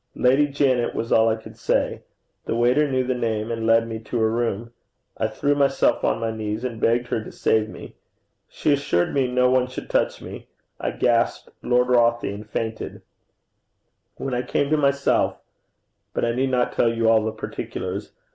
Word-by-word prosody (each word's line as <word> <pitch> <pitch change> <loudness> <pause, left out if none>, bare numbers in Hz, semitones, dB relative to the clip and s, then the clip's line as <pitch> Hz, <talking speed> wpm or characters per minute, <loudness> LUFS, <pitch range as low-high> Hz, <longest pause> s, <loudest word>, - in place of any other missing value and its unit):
'Lady 135 +4 +3
Janet,' 135 -4 +1
was 115 - -3
all 110 0 +5
I 110 - +1
could 110 - -12
say. - - 0 0.4
The - - -2
waiter 125 +5 +3
knew 130 -1 +1
the 130 0 0
name, 115 -2 -2
and 115 -1 -2
led 115 0 +4
me 110 -1 -5
to 115 +2 -4
her 110 -1 +2
room. 115 -1 -2 0.5
I - - +1
threw 145 0 0
myself 140 -1 +2
on - - +1
my 115 0 -1
knees, 110 +1 -4
and 120 -3 -4
begged 120 +1 +2
her 110 - -1
to - - -9
save 110 -1 +1
me. - - -10 0.6
She 150 - +1
assured 140 -12 0
me 135 -2 +2
no 125 0 +3
one 130 -1 +3
should 130 - -8
touch - - +1
me. - - -9 0.3
I - - -1
gasped 120 -1 0
'Lord 125 +1 +2
Rothie,' 120 -3 +2
and 105 +1 -9
fainted. 110 +1 -4 1.1
When 135 - -4
I 125 - 0
came 140 +3 -1
to - - +5
myself 140 -1 +2 0.8
but - - +1
I 115 - +1
need 130 +3 0
not 125 -1 +1
tell 115 - +2
you 115 -1 0
all 110 -1 +4
the 110 - -1
particulars. 100 -2 -5
120 Hz, 190 wpm, -23 LUFS, 110-130 Hz, 1.1 s, all